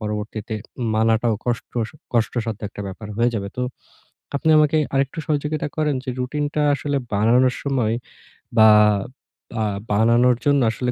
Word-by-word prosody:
পরবর্তীতে 105 Hz, +1 st, -4 dB, 0.4 s
মানাটাও 110 Hz, +1 st, +2 dB
কষ্ট 120 Hz, -1 st, -1 dB, 0.5 s
কষ্টসাধ্য 115 Hz, -2 st, -1 dB
একটা 100 Hz, -, -10 dB
ব্যাপার 105 Hz, +3 st, -8 dB
হয়ে 120 Hz, +1 st, +3 dB
যাবে। 100 Hz, -2 st, -3 dB
তো 125 Hz, -, -1 dB, 0.7 s
আপনি 160 Hz, -, +1 dB
আমাকে 155 Hz, +1 st, +3 dB, 0.2 s
আরেকটু 135 Hz, +3 st, 0 dB
সহযোগিতা 150 Hz, 0 st, -1 dB
করেন, 150 Hz, -2 st, +1 dB
যে, 130 Hz, -, -3 dB
রুটিনটা 145 Hz, +3 st, -1 dB
আসলে 145 Hz, 0 st, -2 dB, 0.2 s
বানানোর 120 Hz, +5 st, +3 dB
সময় 125 Hz, -6 st, 0 dB, 0.6 s
বা 110 Hz, 0 st, +8 dB, 1.2 s
বানানোর 115 Hz, +4 st, +4 dB
জন্য 145 Hz, -2 st, +4 dB
আসলে 125 Hz, +2 st, -2 dB
120 Hz, 125 wpm, -22 LUFS, 110-140 Hz, 1.2 s, বা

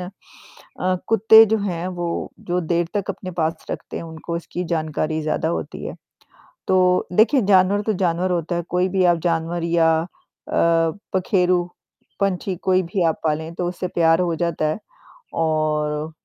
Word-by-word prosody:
अ, 185 Hz, 0 st, -6 dB
कुत्ते 220 Hz, 0 st, +7 dB
जो 220 Hz, +1 st, +1 dB
हैं 180 Hz, -3 st, -3 dB
वो 170 Hz, -1 st, -3 dB
जो 180 Hz, 0 st, -1 dB
देर 170 Hz, 0 st, 0 dB
तक 200 Hz, -2 st, -1 dB
अपने 185 Hz, -, -7 dB
पास 160 Hz, +1 st, -2 dB
रखते -, -, -6 dB
हैं -, -, -5 dB
उनको 165 Hz, +1 st, -6 dB
उसकी 175 Hz, +1 st, -5 dB
जानकारी 155 Hz, 0 st, -2 dB
ज़्यादा 155 Hz, +1 st, -1 dB
होती 170 Hz, -, -4 dB
है। -, -, -6 dB, 0.7 s
तो 185 Hz, -1 st, +3 dB
देखिए 235 Hz, +8 st, +4 dB
जानवर 195 Hz, +1 st, +4 dB
तो 215 Hz, -, 0 dB
जानवर 175 Hz, +1 st, +1 dB
होता 170 Hz, 0 st, -1 dB
है 170 Hz, -, -1 dB
कोई 180 Hz, +1 st, +1 dB
भी 185 Hz, 0 st, +1 dB
आप 175 Hz, -1 st, +4 dB
जानवर 170 Hz, 0 st, -1 dB
या 165 Hz, -1 st, +3 dB
अ, 165 Hz, -, -4 dB, 1.1 s
पखेरू, 180 Hz, -1 st, +2 dB, 0.6 s
पंछी 190 Hz, -1 st, -1 dB
कोई 185 Hz, 0 st, +3 dB
भी 180 Hz, +2 st, -2 dB
आप 160 Hz, -1 st, 0 dB
पालें 160 Hz, +1 st, -1 dB
तो 175 Hz, 0 st, -2 dB
उससे 180 Hz, 0 st, -4 dB
प्यार 165 Hz, 0 st, +3 dB
हो 170 Hz, -2 st, 0 dB
जाता 170 Hz, -2 st, -1 dB
है। 155 Hz, -, -2 dB, 0.7 s
और 155 Hz, 0 st, -1 dB
175 Hz, 160 wpm, -21 LUFS, 165-185 Hz, 1.1 s, कुत्ते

